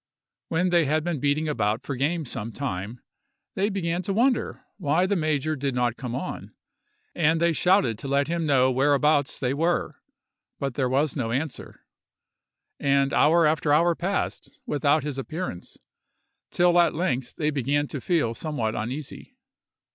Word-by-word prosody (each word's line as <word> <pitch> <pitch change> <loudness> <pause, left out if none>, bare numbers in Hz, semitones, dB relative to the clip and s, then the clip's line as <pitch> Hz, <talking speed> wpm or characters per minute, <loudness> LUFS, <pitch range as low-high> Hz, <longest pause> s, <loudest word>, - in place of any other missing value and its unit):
When 180 +2 0
they 170 -2 +4
had 155 +2 +1
been 170 -3 -2
beating 145 +3 0
about 110 -7 0
for 140 - -4
game 155 +5 -1
some 115 -2 -5
time, 115 -3 -5 0.5
they 200 +2 0
began 175 -3 -2
to 195 +2 -3
wonder 245 +4 +1
why 170 0 +1
the 200 +2 0
major 155 -2 0
did 135 -2 -2
not 120 -1 +1
come 125 -2 -5
on, 160 +8 -6 0.6
and 165 -1 +2
they 170 0 +2
shouted 160 - +2
to 140 - -6
let 140 +1 +1
him 165 -1 -1
know 130 -2 +4
whereabouts 145 +2 +2
they 125 0 0
were; 165 +5 -1 0.6
but 135 -2 -2
there 130 0 0
was 140 +2 +1
no 120 -6 -2
answer, 140 +4 -4 1.0
and 140 0 +2
hour 165 +2 +4
after 150 -1 +1
hour 170 +4 +4
passed 190 +4 -3
without 145 +1 +1
his 145 -2 -4
appearance, 155 - -6 0.7
till 175 0 +3
at 170 -2 +3
length 130 -7 -2
they 150 -1 0
began 145 +1 0
to 140 - -5
feel 155 -9 +1
somewhat 120 -5 -3
uneasy. 130 +6 -6
145 Hz, 160 wpm, -25 LUFS, 130-170 Hz, 1.0 s, they